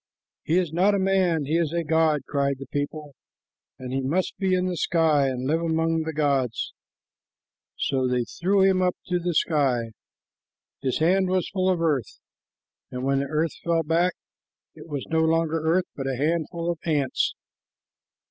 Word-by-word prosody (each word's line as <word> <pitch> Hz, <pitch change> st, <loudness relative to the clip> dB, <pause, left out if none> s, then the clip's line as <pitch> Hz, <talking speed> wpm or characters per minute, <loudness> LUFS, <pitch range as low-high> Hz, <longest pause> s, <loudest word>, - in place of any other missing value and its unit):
"He 165 Hz, -, +1 dB
is 175 Hz, -4 st, 0 dB
not 195 Hz, +4 st, +3 dB
a -, -, +1 dB
man; 185 Hz, -5 st, +2 dB
he 155 Hz, +4 st, +1 dB
is 160 Hz, -3 st, 0 dB
a 170 Hz, 0 st, -1 dB
god," 160 Hz, -1 st, +2 dB
cried 140 Hz, -1 st, 0 dB
the 135 Hz, -, -8 dB
people, 145 Hz, +2 st, -4 dB, 0.6 s
"and 130 Hz, 0 st, -7 dB
he 135 Hz, -, 0 dB
must 160 Hz, +8 st, -1 dB
be 190 Hz, -2 st, +2 dB
in 180 Hz, 0 st, 0 dB
the 180 Hz, -1 st, -1 dB
sky 160 Hz, -5 st, +2 dB
and 130 Hz, -1 st, -3 dB
live 160 Hz, +4 st, +1 dB
among 165 Hz, 0 st, +1 dB
the 160 Hz, 0 st, -3 dB
gods;" 140 Hz, -6 st, 0 dB, 1.0 s
so 130 Hz, -2 st, 0 dB
they 125 Hz, -1 st, +1 dB
threw 190 Hz, +10 st, 0 dB
him 190 Hz, -1 st, +3 dB
up 180 Hz, -1 st, +1 dB
to 180 Hz, 0 st, 0 dB
the 175 Hz, -1 st, -2 dB
sky. 130 Hz, -8 st, +1 dB, 0.9 s
His 130 Hz, -2 st, 0 dB
hand 185 Hz, +4 st, +2 dB
was 185 Hz, -1 st, 0 dB
full 190 Hz, -1 st, 0 dB
of 180 Hz, -3 st, +1 dB
earth, 145 Hz, -9 st, -1 dB, 0.7 s
and 125 Hz, 0 st, -5 dB
when 135 Hz, 0 st, +1 dB
the 140 Hz, -, -2 dB
earth 155 Hz, +1 st, 0 dB
fell 165 Hz, -1 st, +1 dB
back, 170 Hz, +3 st, +2 dB, 0.6 s
it -, -, -13 dB
was 145 Hz, -4 st, -4 dB
no 160 Hz, -, +2 dB
longer 165 Hz, 0 st, +2 dB
earth, 165 Hz, +4 st, +1 dB
but 135 Hz, -1 st, -4 dB
a 135 Hz, -, -1 dB
handful 165 Hz, +4 st, -1 dB
of 170 Hz, -, -6 dB
ants. 145 Hz, -5 st, 0 dB
160 Hz, 175 wpm, -25 LUFS, 140-175 Hz, 1.0 s, not